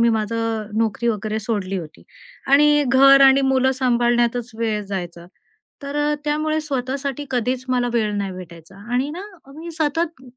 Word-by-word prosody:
मी 235 - +4
माझं 225 0 -2
नोकरी 225 +1 0
वगैरे 215 0 -2
सोडली 200 -3 -3
होती 160 -2 -10 0.5
आणि 295 0 +5
घर 275 +1 +6
आणि 270 0 +6
मुलं 265 0 +2
सांभाळण्यातच 240 -1 +1
वेळ 220 -2 -1
जायचा. 175 -3 -6 0.6
तर 280 +1 -5
अ, 295 0 +1
त्यामुळे 310 +1 0
स्वतःसाठी 275 0 -3
कधीच 250 +1 -1
मला 245 -1 +1
वेळ 215 -3 0
नाही 195 -1 -3
भेटायचा 175 0 -12 0.2
आणि 260 +4 0
ना 350 +5 -7 0.3
मी 335 +2 -8
सतत 315 -1 -1
245 Hz, 150 wpm, -21 LUFS, 215-280 Hz, 0.6 s, घर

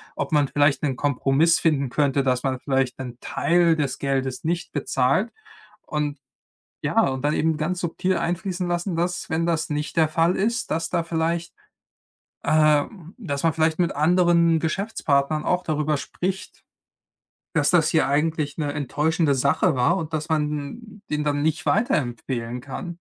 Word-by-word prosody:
ob - - -3
man 145 -2 +3
vielleicht 145 -1 +2
'nen 135 -3 0
Kompromiss 145 +3 +2
finden 140 -5 +1
könnte, 140 +1 +1
dass 125 -2 0
man 130 -2 -1
vielleicht 135 -2 0
'nen 125 -2 -7
Teil 170 -1 +2
des 140 -3 -2
Geldes 135 -2 -2
nicht 170 +2 -2
bezahlt. 140 - +1 0.5
Und 150 -2 -3 0.6
ja - - +2
und 130 0 -4
dann 150 - +2
eben 160 0 +1
ganz 175 +4 -2
subtil 180 +2 -1
einfließen 180 +1 -2
lassen, 175 +1 -1
dass 175 +1 -2
wenn 165 +1 0
das 165 -2 -1
nicht 150 +2 -3
der 160 -1 +5
Fall 165 +3 +2
ist, 235 +4 -1
dass 165 - 0
da 170 -2 0
vielleicht, 165 +1 -2 0.9
ähm 155 +4 +2
dass 150 - -4
man 165 - +4
vielleicht 160 0 +1
mit 175 - +1
anderen 170 +1 +3
Geschäftspartnern 155 -5 0
auch 180 0 +1
darüber 150 -2 0
spricht 185 +6 -4 1.1
dass 150 -2 +3
das 170 -4 +4
hier 160 -4 +2
eigentlich 150 0 0
'ne 145 -3 -2
enttäuschende 150 +2 0
Sache 140 +2 +2
war 130 +7 +3
und 165 -4 -4
dass 155 -1 -3
man 155 -2 0
n 205 +9 -7
den 150 0 -1
dann 145 -1 0
nicht 155 +1 -1
weiterempfehlen 125 - -1
kann. 165 +6 -7
155 Hz, 160 wpm, -23 LUFS, 140-170 Hz, 1.1 s, der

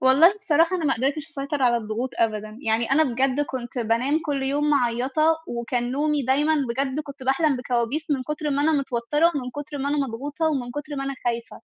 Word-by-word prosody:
والله 275 +9 +6
بصراحة، 335 -1 +3
أنا 335 - -3
ما 275 - +3
قدرتِش 280 +6 -2
أسيطر 280 -2 -3
على 240 -2 +4
الضغوط 230 +3 -3
أبدًا. 215 -1 -1
يعني 225 0 +1
أنا 315 +3 +5
بجد 260 +1 +1
كنت 260 -3 -4
بانام 240 +7 +1
كل 280 -2 -1
يوم 290 +2 +1
معيَّطة، 270 +4 +2
وكان 240 +1 -2
نومي 295 +1 +1
دايمًا، 285 +5 +2 0.2
بجد، 265 +3 -1
كنت 280 -2 -10
باحلَم 275 +2 +2
بكوابيس 250 +5 -2
من 275 -3 +1
كُتر 300 +2 -3
ما 280 0 +1
أنا 320 +2 +3
متوتّرة، 275 +2 +1
ومن 250 -3 -3
كُتر 290 +2 -6
ما 275 - -1
أنا 295 +1 0
مضغوطة، 285 +7 -3
ومن 270 -6 -1
كُتر 290 +2 -6
ما 275 - -2
أنا 275 0 -3
خايفة. 235 -1 -3
275 Hz, 200 wpm, -24 LUFS, 245-295 Hz, 0.2 s, والله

